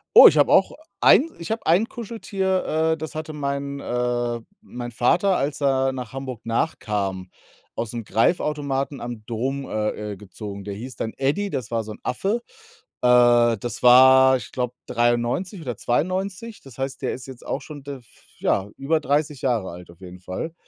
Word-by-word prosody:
Oh, - - +12
ich - - +4
habe - - +4
auch - - +5 0.3
ein - - +7 0.2
iche 170 +6 -2
hab 230 - -6
ein 180 +7 +4
Kuscheltier, 190 -8 -1
äh, - - -3
das 160 0 -6
hatte 155 0 -5
mein 140 -1 -3
äh, 120 -1 -1 0.2
mein 120 - -7
Vater, 180 - +2
als 140 +1 -2
er 135 -1 +2
nach 125 -3 -6
Hamburg 130 -3 -6
nachkam, 105 - -2 0.5
ausm 115 0 -4
Greifautomaten 140 - 0
am 120 -2 -6
Dom, 130 +4 -3
äh, 105 -1 -3
äh, 100 - -10
gezogen. 100 0 -8
Der 100 0 -5
hieß 125 +6 -8
dann 110 - -4
Eddie, 150 +10 0
das 125 -4 -4
war 115 -1 -1
so 110 - -8
'n 105 - -10
Affe. 200 - -1 0.6
Äh, 120 -1 +5
das 120 0 -6
war, 130 +1 +8
ich - - -10
glaube, 125 -1 -2
93 120 - 0
oder 125 -6 -5
92. 185 - -2
Das 135 -4 -14
heißt, 135 0 -4
der 130 - 0
ist 125 - -8
jetzt 130 -2 -11
auch 140 - -3
schon, 145 -3 -10
d 140 0 -6
f 120 -3 -20 0.3
ja, 100 +1 0
über 155 +4 +1
30 145 -1 -1
Jahre 115 -7 0
alt 90 0 -11
auf 85 +2 -20
jeden 90 0 -10
Fall. 95 - -5
130 Hz, 180 wpm, -23 LUFS, 115-150 Hz, 0.6 s, Oh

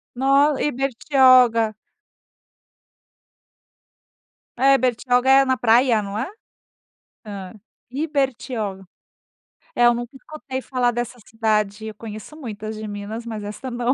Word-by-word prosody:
Nó, 275 +2 +3
Ibertioga. 255 -4 +3 2.9
É, 275 +1 +6
Bertioga 250 0 +1
é 270 0 +6
na 260 0 +2
praia, 235 -1 +3
não 200 +1 -5
é? 245 - -2 1.0
Hã. 195 -3 -7 0.4
Ibertioga. 260 -8 -2 0.9
É, 240 - +3
eu 240 - +6
nunca 240 +1 -6
escutei 270 -1 -7
falar 250 -2 0
dessa 240 +1 -4
cidade, 215 -1 -1
eu 215 - -8
conheço 215 +6 -9
muitas 220 -6 -7
de 215 0 -7
Minas, 210 +2 -6
mas 220 -3 -6
esta 245 +5 -7
não. 240 +1 0
240 Hz, 110 wpm, -22 LUFS, 215-265 Hz, 2.9 s, É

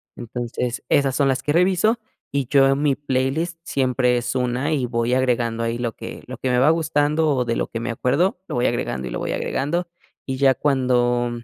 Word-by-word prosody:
Entonces, 120 +1 -4
esas 140 -3 +2
son 140 -1 +2
las 130 -1 0
que 145 - 0
reviso, 185 +6 +3 0.3
y 140 -2 -1
yo 135 -1 +5
en 135 +1 +1
mi 145 -2 +2
playlist 145 +5 -1
siempre 125 -4 +1
es 120 - -2
una, 130 +4 0
y 130 -5 0
voy 115 0 0
agregando 120 -3 +1
ahí 115 0 -1
lo 120 -1 -2
que - - -8
lo - - -8
que 130 - -2
me 125 - +2
va 135 +5 +5
gustando, 155 -1 +1
o 125 -1 0
de 115 -1 -1
lo - - -1
que 115 - -5
me 115 - -3
acuerdo, 155 +11 +1
lo - - -4
voy 120 - +1
agregando 65 -1 -1
y - - -6
lo - - -3
voy - - -2
agregando. 170 +6 -1 0.4
Y 130 - -1
ya 135 -1 +4
cuando 125 -3 +1
130 Hz, 215 wpm, -22 LUFS, 120-145 Hz, 0.4 s, yo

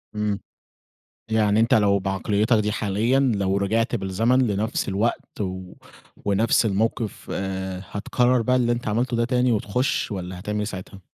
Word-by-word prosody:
إمم. 105 -2 -1 0.9
يعني 110 -1 +3
أنت 115 - +4
لو 100 -2 +4
بعقليّتك 100 +4 +1
دي 105 0 0
حاليًا 110 +5 +1
لو 100 -7 +1
رجِعت 115 +5 0
بالزمن 110 +5 +1
لنفْس 105 +2 -1
الوقت 105 +3 -2
و 95 -2 -4 0.5
ونفس 105 +3 +2
الموقِف، 110 +1 -1
آآ، 95 -1 -4
هتكرّر 120 +4 +1
بقى 125 +3 +2
اللي 120 -1 +2
أنت 120 -1 -3
عملته 120 +3 0
ده 115 - +2
تاني 125 0 +2
وتخشّ 115 +5 0
والّا 90 -1 -5
هتعمل 105 +3 -3
إيه 105 - 0
ساعتها؟ 95 -1 -7
105 Hz, 150 wpm, -23 LUFS, 100-115 Hz, 0.9 s, أنت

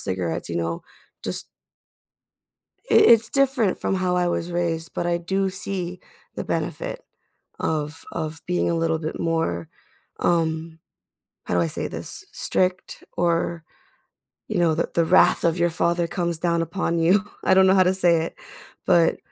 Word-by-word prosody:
cigarettes, 90 -3 -2
you 85 - -3
know, 85 0 -2 0.4
just - - -3 1.4
it - - +4
it's 230 -1 +6
different 265 -7 +2
from - - 0
how 180 -1 0
I 180 -1 +2
was 175 0 -2
raised, 170 -1 -2
but 175 - -2
I 170 0 +1
do 190 +3 -1
see 185 -1 -4 0.3
the - - -4
benefit - - -3 0.6
of 155 0 -2
of 155 0 -4
being 180 0 0
a - - +1
little 165 -1 0
bit 155 0 -5
more, 160 - -1 0.5
um- 160 -1 0 0.7
how - - -2
do 90 - +3
I 85 - +2
say - - -3
this- - - -6
strict 185 0 -1
or, 170 -1 0 0.8
you 215 - -1
know, 170 -2 +3
the 165 - -1
the 170 - +3
wrath 185 +3 +4
of 170 +1 +2
your 175 0 +2
father 170 +1 +1
comes 170 -3 -2
down 170 0 +1
upon 170 0 -1
you, 185 +5 +4 0.2
I 190 - +5
don't 190 0 +6
know 190 - +5
how 190 - +6
to 185 +1 +2
say 170 -3 +3
it, - - -7 0.5
but 170 -2 +4
170 Hz, 165 wpm, -23 LUFS, 160-185 Hz, 1.4 s, it's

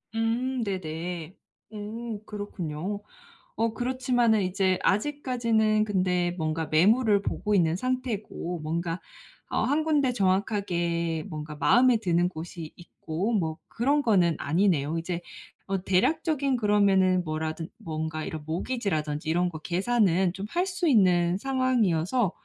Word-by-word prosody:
음 240 +3 0
네네. 175 -2 -4 0.4
음 220 +1 -5
그렇군요. 200 -2 -5 0.5
어 225 0 0
그렇지만은 245 -3 +1
이제 185 0 +1
아직까지는 230 -3 +1
근데 180 -4 +1
뭔가 160 0 -2
매물을 205 +6 +4
보고 210 -1 -1
있는 165 -3 +3
상태고 220 -6 -3
뭔가 165 +2 -2 0.5
어 - - 0
1 295 +4 +1
군데 290 -5 +2
정확하게 180 -5 0
뭔가 150 -1 -6
마음에 245 +9 +4
드는 175 -4 +1
곳이 165 -1 -8
있고 175 +4 -4
뭐 160 -7 0
그런 280 +5 +1
거는 180 -7 +3
아니네요. 165 -2 +1
이제 170 +1 -4 0.5
어 195 -1 -1
대략적인 280 - +1
그러면은 195 -4 +3
뭐라든 160 +1 -3
뭔가 155 -1 -4
이런 155 -2 -5
모기지라든지 160 -5 -2
이런 175 +2 +2
거 160 - -7
계산은 185 0 +1
좀 195 +1 -5
할 355 +2 0
수 360 -2 -1
있는 180 - +4
상황이어서 240 -6 +1
190 Hz, 280 characters per minute, -27 LUFS, 170-230 Hz, 0.5 s, 매물을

